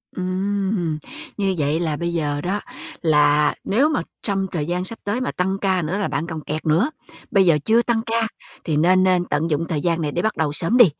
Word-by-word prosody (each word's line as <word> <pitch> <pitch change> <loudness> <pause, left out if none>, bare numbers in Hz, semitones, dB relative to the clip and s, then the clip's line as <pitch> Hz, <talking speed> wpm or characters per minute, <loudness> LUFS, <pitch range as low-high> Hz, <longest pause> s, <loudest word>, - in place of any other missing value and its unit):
Ừm. 185 -2 -1 0.4
Như 195 -2 0
vậy 150 +1 +1
là 160 -3 -1
bây 170 +1 -2
giờ 145 -3 -1
đó, 195 +3 -1 0.4
là 150 -2 +4
nếu 260 +10 +2
mà 310 - 0 0.2
trong 195 -2 0
thời 155 -4 -2
gian 180 +3 -2
sắp 225 +4 -6
tới 205 +5 -1
mà 255 - -1
tăng 190 +2 -1
ca 190 -2 +1
nữa 170 +4 -2
là 205 - 0
bạn 165 - -2
còn 160 -2 -5
kẹt 155 +1 -4
nữa. 165 - +3 0.4
Bây 195 -5 +4
giờ 165 -4 +5
chưa 225 +2 +4
tăng 235 -2 0
ca 230 0 0 0.4
thì 155 -3 0
nên 185 +4 +4
nên 180 -1 +3
tận 155 +1 -1
dụng 155 +3 +1
thời 155 -4 -1
gian 170 0 0
này 150 -2 -1
để 170 - -1
bắt 220 +3 -1
đầu 150 -2 0
sớm 170 +10 +2
đi. 240 - +10
180 Hz, 230 wpm, -22 LUFS, 155-200 Hz, 0.4 s, đi